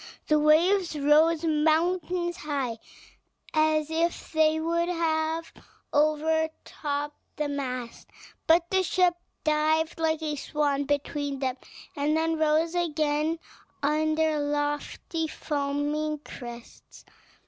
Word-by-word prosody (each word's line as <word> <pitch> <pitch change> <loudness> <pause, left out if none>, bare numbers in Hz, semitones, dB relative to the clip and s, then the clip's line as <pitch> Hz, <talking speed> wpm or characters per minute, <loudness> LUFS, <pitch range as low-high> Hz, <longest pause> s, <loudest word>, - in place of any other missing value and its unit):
The 305 0 +5
waves 330 +3 +3
rose 310 +3 +4
mountains 345 +3 +1
high, 275 -8 -3 0.7
as 310 0 +2
if 335 +1 -1
they 315 0 +3
would 335 +2 0
have 325 -1 -1 0.4
overtopped 300 -1 0 0.2
the 300 - -1
mast; 255 -4 -5 0.4
but 335 +1 +5
the 380 0 +3
ship 365 0 +3 0.3
dived 315 +2 +1
like 320 -1 0
a 300 -1 -1
swan 285 -1 0
between 285 0 -2
them, 260 -1 -2 0.4
and 295 +2 +1
then 325 0 0
rose 315 +2 +2
again 310 -2 0 0.5
on 310 +2 +2
their 315 -1 +1
lofty, 295 +2 -2
foaming 295 +1 -2
crests. 240 -2 -11
310 Hz, 105 wpm, -27 LUFS, 290-325 Hz, 0.7 s, The